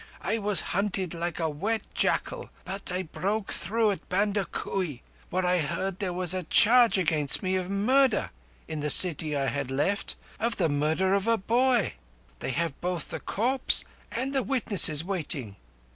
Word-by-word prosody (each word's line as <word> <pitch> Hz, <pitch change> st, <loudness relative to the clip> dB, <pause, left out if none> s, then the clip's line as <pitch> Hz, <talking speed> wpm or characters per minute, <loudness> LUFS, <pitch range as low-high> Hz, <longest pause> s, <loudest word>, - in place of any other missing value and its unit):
I 220 Hz, +5 st, -1 dB
was 205 Hz, -2 st, +4 dB
hunted 190 Hz, -2 st, -1 dB
like 170 Hz, +1 st, -4 dB
a 165 Hz, -, 0 dB
wet 200 Hz, +10 st, -2 dB
jackal; -, -, 0 dB, 0.2 s
but 195 Hz, 0 st, -3 dB
I 180 Hz, +1 st, -2 dB
broke 200 Hz, +5 st, -3 dB
through 220 Hz, +3 st, 0 dB
at 195 Hz, -, -7 dB
Bandakui, 195 Hz, -6 st, -2 dB, 0.3 s
where 185 Hz, 0 st, -1 dB
I 180 Hz, 0 st, +2 dB
heard 175 Hz, +4 st, -2 dB
there 190 Hz, -3 st, -2 dB
was 180 Hz, 0 st, 0 dB
a 185 Hz, -, -1 dB
charge 230 Hz, +6 st, +5 dB
against 155 Hz, -5 st, +1 dB
me 185 Hz, 0 st, 0 dB
of 185 Hz, -1 st, -2 dB
murder 240 Hz, +3 st, +2 dB, 0.4 s
in 155 Hz, -, -5 dB
the 150 Hz, 0 st, -2 dB
city 155 Hz, -3 st, +5 dB
I 135 Hz, -, 0 dB
had 140 Hz, -1 st, -2 dB
left—of 200 Hz, -, -2 dB
the 170 Hz, -4 st, +1 dB
murder 155 Hz, +6 st, +1 dB
of 200 Hz, +2 st, 0 dB
a 230 Hz, 0 st, +3 dB
boy. 240 Hz, +2 st, +2 dB, 0.5 s
They -, -, -4 dB
have 160 Hz, +2 st, -2 dB
both 175 Hz, -3 st, -3 dB
the -, -, -4 dB
corpse 255 Hz, +5 st, 0 dB, 0.3 s
and 270 Hz, +2 st, -2 dB
the 270 Hz, -, +1 dB
witnesses 200 Hz, -, +2 dB
waiting." 155 Hz, -, -2 dB
185 Hz, 165 wpm, -27 LUFS, 165-210 Hz, 0.5 s, charge